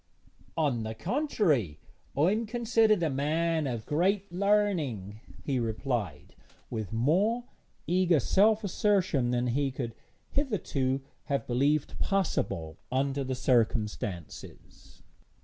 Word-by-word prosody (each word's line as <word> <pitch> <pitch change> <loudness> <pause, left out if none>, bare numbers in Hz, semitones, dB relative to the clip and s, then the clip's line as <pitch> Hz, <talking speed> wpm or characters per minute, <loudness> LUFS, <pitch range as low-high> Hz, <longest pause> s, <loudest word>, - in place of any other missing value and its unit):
'On 140 -7 +1
the 110 0 -4
contrary, 145 - 0 0.4
I 160 +6 +4
am 220 +2 -1
considered 225 -4 +2
a 160 - +2
man 155 +3 0
of 115 -4 -4
great 190 +6 +1
learning,' 175 - 0 0.2
he 135 -3 0
replied, 115 - -3 0.4
with 110 -5 -4
more 185 - +2 0.4
eager 180 -2 +3
self 210 - +3
assertion 185 - +1
than 125 0 +1
he 135 +3 +1
could 125 -3 -5 0.4
hitherto 145 - 0 0.2
have 140 -5 -1
believed 140 +4 +1
possible 130 - -1
under 135 +1 0
the 130 0 -2
circumstances. 105 - -2
140 Hz, 110 wpm, -29 LUFS, 120-195 Hz, 0.4 s, I